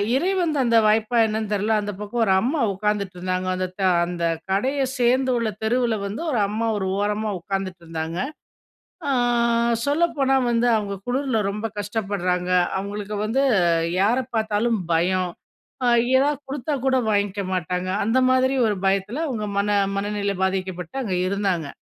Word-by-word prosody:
இறைவன் 350 0 +1
தந்த 235 -3 +3
வாய்ப்பா 220 +2 +2
என்னன்னு 215 -1 -3
தெரில. 210 +2 +1
அந்த 205 0 -4
பக்கம் 225 +3 -1
ஒரு 190 - +3
அம்மா 280 +5 0
உட்காந்துட்ருந்தாங்க. 185 -2 -2
அந்த 185 0 -2
த - - -3 0.3
அந்த 175 -1 -4 0.3
கடைய 265 +9 0 0.2
சேர்ந்துள்ள 245 -2 +2
தெருவுல 235 0 +1
வந்து 210 +10 -5
ஒரு 235 - +1
அம்மா 220 +3 -2
ஒரு 190 -1 -2
ஓரமா 210 +1 -1
உட்காந்துட்ருந்தாங்க. 170 -4 -4 0.9
ஆ - - +2 0.7
சொல்லப்போனா 285 -3 +2 0.2
வந்து 235 +1 +2
அவுங்க 205 -2 -2
குளிர்ல 255 -2 0
ரொம்ப 210 +2 -5
கஷ்டப்படுறாங்க. 195 -4 -2 0.3
அவுங்களுக்கு 205 +1 -4
வந்து 245 +6 +1 0.6
யார 220 +6 +3 0.2
பார்த்தாலும் 220 0 +1
பயம். 180 +2 +1 0.5
ஆ - - +3 0.3
எதா 285 +2 +3 0.2
கொடுத்தா 290 +2 -3
கூட 260 0 +3
வாங்கிக்க 200 -1 0
மாட்டாங்க. 180 0 -2 0.2
அந்த 230 +4 +2
மாதிரி 260 +1 +3
ஒரு 205 -2 0
பயத்தில 200 +11 0
அவுங்க 215 -5 -3
மன 205 0 +2 0.2
மனநிலை 200 -1 -1
பாதிக்கப்பட்டு 185 -1 -3
அங்க 190 -5 -2
இருந்தாங்க. 190 -6 -1
210 Hz, 135 wpm, -23 LUFS, 190-245 Hz, 0.9 s, தந்த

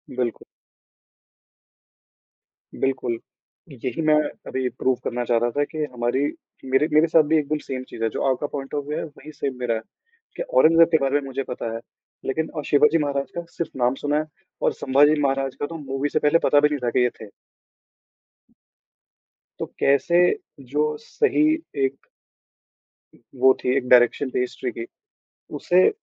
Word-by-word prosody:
बिल्कुल। 125 -2 -2 2.3
बिल्कुल। 130 -3 -1 0.5
यही 130 +5 -4
मैं 155 - +6 0.3
अभी 130 -1 -2
प्रूव 130 +1 0
करना 120 0 -2
चाह 120 0 +2
रहा 120 - +1
था 145 - +3
कि 155 +1 -4
हमारे 120 +1 0 0.5
मेरे 135 +3 +2
मेरे 155 +2 +5
साथ 160 -1 +5
भी 160 - +5
एकदम 150 0 0
सेम 130 -1 -4
चीज़ 115 - -6
है। 115 - +2
जो - - -5
आपका 130 +3 -2
पॉइंट 135 -2 -7
ऑफ 145 -1 -2
व्यू 150 - -3
है, - - -2
वही 150 0 -12
सेम 140 -3 -4
मेरा 120 -2 0
है 110 - -3 0.6
कि - - -2
औरंगज़ेब 165 - +5
के 160 - +5
बारे 140 +1 +2
में 135 - -8
मुझे 135 +1 -3
पता 115 -3 -5
है - - -4 0.5
लेकिन 160 +4 -1
अ, - - -1
शिवाजी 150 +3 +4
महाराज 140 -3 -2
का 170 - -3
सिर्फ़ 160 -5 -6
नाम 125 +1 +2
सुना 145 +2 -1
है 155 - -2 0.4
और - - +2
संभाजी 145 +3 +3
महाराज 135 -1 0
का - - -3
तो 165 +1 -7
मूवी 135 0 -3
से 155 - +1
पहले 150 +3 +3
पता 145 - +5
भी 150 +1 +4
नहीं 145 - -2
था, - - +2
कि - - +1
ये 125 - +3
थे। 110 - -8 2.3
तो - - -2
कैसे 140 +6 +3 0.5
जो 150 +2 +1 0.2
सही 305 - +1 0.4
एक 135 +1 -6 1.3
वो 130 +1 +5
थी 125 +1 +1
एक 125 - -2
डाएरेक्शन 125 +2 +5
थी - - -2
हिस्ट्री 125 0 -3
की, 115 - -6 0.7
उसे 180 +5 +4
140 Hz, 175 wpm, -23 LUFS, 125-150 Hz, 2.3 s, मैं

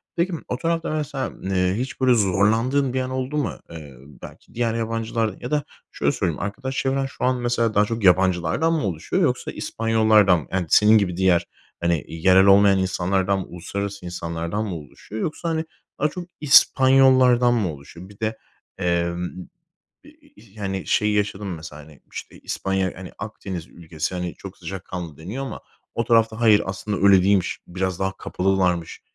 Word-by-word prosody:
Peki, 175 +2 0
m 165 - -3
o 125 - -2
tarafta 165 +3 -1
mesela, 145 -3 -3
eee, 90 -1 +1
hiç, 130 +1 -5
böyle, 130 -1 +5
zorlandığın 115 +6 +2
bir 130 - 0
an 130 - -3
oldu 130 +3 -3
mu? 145 - -2
Eee, 75 -4 -10 0.3
belki - - -13
diğer 115 -1 0
yabancılar 115 -1 -2
ya 125 - -6
da 150 -1 +1 0.3
şöyle - - 0
söyleyeyim, 80 - -2
arkadaş 130 +6 -4
çevren 135 0 0
şu 135 - -8
an 130 0 +2
mesela 120 -2 0
daha 105 0 +4
çok 115 0 -4
yabancılardan 95 - +3
mı 160 - 0
oluşuyor 80 -4 -2
yoksa - - 0
İspanyollardan 110 -5 +3
mı, 75 - -11
yani, 95 -1 0
senin 105 +5 +6
gibi 90 -4 0
diğer, 90 -2 +3 0.4
hani, 85 -2 0
yerel 95 +4 +4
olmayan 100 0 +6
insanlardan 95 +1 0
mı 95 - -5
uluslararası 100 +2 -5
insanlardan 85 +4 -3
mı 95 -4 -4
oluşuyor 80 - -9
yoksa, 165 +2 -3
hani, 160 0 -1 0.3
daha 150 - +2
çok 175 +3 -8
İspanyollardan 130 -3 +5
mı 100 -9 0
oluşuyor? 85 +6 -12
Bir 100 - -17
de, 110 0 -2 0.4
emm, 85 0 -1 0.8
i - - -16
i - - -21 0.2
i 110 -1 -19
yani, 95 -2 -3
şey 105 0 +2
yaşadın 105 -1 -1
mı 90 -3 -4
mesela, 80 -1 -10
hani, 75 -1 -17
işte, - - -9
İspanya, 95 -1 -2
hani, 95 0 -9
Akdeniz 95 -5 -6
ülkesi, 85 +1 -5
hani, 90 -3 -4
çok - - -11
sıcakkanlı 90 -4 -7
deniyor 100 - -6
ama - - -7 0.3
o 115 - -1
tarafta 115 -1 +2
hayır 110 -3 +5
aslında 95 +2 -3
öyle 95 -2 +7
değilmiş, 100 -1 +1
biraz 95 0 -3
daha 95 0 -2
kapalılarmış 90 -4 -1
100 Hz, 175 wpm, -23 LUFS, 90-120 Hz, 0.8 s, öyle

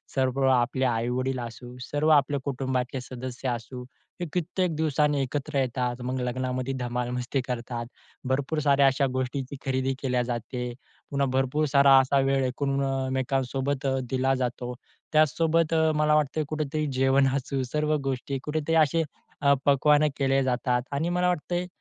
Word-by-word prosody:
सर्व 130 0 +1
आपले 130 +1 +2
आई-वडील 125 +2 0
असू 120 +1 -8
सर्व 145 +5 0
आपल्या 145 -1 +4
कुटुंबातले 130 -1 -2
सदस्य 130 +1 -6
असू 125 +1 -5 0.4
हे - - 0
कित्येक 180 0 -1
दिवसांनी 150 -2 +1
एकत्र 140 +2 -3
येतात 125 -1 -1
मग 130 +1 -2
लग्नामध्ये 130 +1 -2
धमाल 125 0 -2
मस्ती 125 +2 -2
करतात. 120 -1 -4 0.4
भरपूर 140 +4 0
साऱ्या 140 -1 +4
अशा 135 +1 +2
गोष्टींची 130 +1 -3
खरेदी 130 0 0
केल्या 125 -2 +1
जाते. 120 +1 -4 0.4
पुन्हा 140 0 +1
भरपूर 135 +3 +1
सारा 140 -1 +7
असा 135 +1 +2
वेळ 135 0 +2
एकमेकांसोबत 135 0 -1 0.2
दिला 130 0 +1
जातो. 125 0 -3 0.4
त्याचसोबत 160 +2 +3
अ, 160 -1 +3
मला 150 0 +3
वाटतं 150 0 +1
आहे 150 - -2
कुठेतरी 155 0 -2
जेवण 135 +1 +4
असू 135 0 -2
सर्व 150 0 +1
गोष्टी 135 +1 -3
कुठेतरी 155 +1 -1
असे 165 +3 0 0.4
अ, 140 0 +5
पक्वाने 150 +2 +4
केले 135 -1 +2
जातात 125 -1 0
आणि 150 +5 -1
मला 180 0 +1
वाटतं 175 0 -1
आहे, 180 +1 -1
135 Hz, 150 wpm, -26 LUFS, 125-145 Hz, 0.4 s, सारा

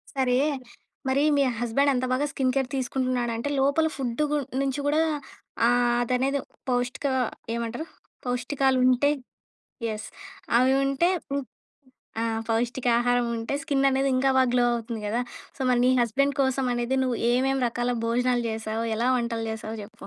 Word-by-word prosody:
సరే. 255 -2 +2 0.7
మరి 270 +2 +2
మీ 280 - +3 0.2
హస్బెండ్ 240 +4 +2
అంత 255 0 0
బాగా 260 +3 +1
స్కిన్ 260 -1 0
కేర్ 265 -2 +1
తీసుకుంటున్నాడంటే, 255 -1 -1
లోపల 285 +4 +3
ఫుడ్ 250 0 -2
గు 300 - +2 0.2
నుంచి 275 0 -1
గూడా 295 +2 +2 0.7
ఆహ్, 240 0 +3
అదనేది 260 +3 0 0.3
పౌష్టిక 245 +3 -1 0.5
ఏమంటారు 235 +6 -3 0.4
పౌష్టికాలుంటే 255 +1 +2 0.8
ఎస్. 215 +1 -7 0.5
అవి 255 +2 +4
ఉంటే 275 +6 +2 0.2
హ్మ్. 280 0 -1 0.8
ఆ! - - 0 0.3
పౌష్టికాహారం 240 +1 +1
ఉంటే 225 +4 -3
స్కిన్ 280 -3 +1
అనేది 270 +1 +1
ఇంకా 270 +1 +3
బాగా 260 -1 +4
గ్లో 245 -1 +3
అవుతుంది 230 -1 -4
కదా! 225 +4 0 0.4
సో - - -21
మరి 245 -1 +3
నీ 255 - +5
హస్బెండ్ 275 +5 +1
కోసం 265 0 +1
అనేది 240 +2 -1
నువ్వు 255 -2 0 0.2
ఏమేమి 265 +2 +1
రకాల 240 +1 -1
భోజనాలు 245 +1 +1
జేశావో, 220 0 -3
ఎలా 235 +3 0
వంటలు 235 -2 -2
జేశావో 220 0 -5
చెప్పు. 220 +3 -12
250 Hz, 145 wpm, -26 LUFS, 235-270 Hz, 0.8 s, నీ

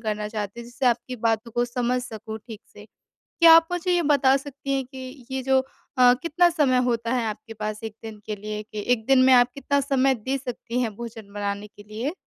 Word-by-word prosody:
करना 210 -1 -3
चाहती 210 0 -5
हूँ 235 - -9
जिससे 245 +2 -3
आपकी 245 +1 0
बातों 225 0 0
को 240 +1 +1
समझ 245 0 -1
सकूँ 220 -2 -7
ठीक 220 -3 -9
से। - - -13 0.6
क्या 330 -1 +9
आप 330 0 +5
मुझे 355 +1 -1
ये 350 -1 +3
बता 280 -3 +4
सकती 275 0 -5
हैं 270 - 0
कि 260 0 -10
ये 265 - -2
जो 265 0 +3 0.4
अ, 250 -1 +7
कितना 345 +2 +3
समय 295 -7 +2
होता 235 -1 -1
है 245 -3 0
आपके 220 +1 -7
पास 215 0 -5
1 220 -1 -6
दिन 220 -1 -8
के 215 - -3
लिए 210 +1 -5
कि 210 -1 -7
1 220 -2 -3
दिन 270 -1 +5
में 260 - +6
आप 245 0 +6
कितना 280 0 0
समय 270 -1 +2
दे 260 +5 -3
सकती 245 -2 -5
हैं 220 -4 -2
भोजन 225 -3 -9
बनाने 205 0 -3
के 205 0 -16
लिए? 235 +8 -3
245 Hz, 225 wpm, -24 LUFS, 220-270 Hz, 0.6 s, क्या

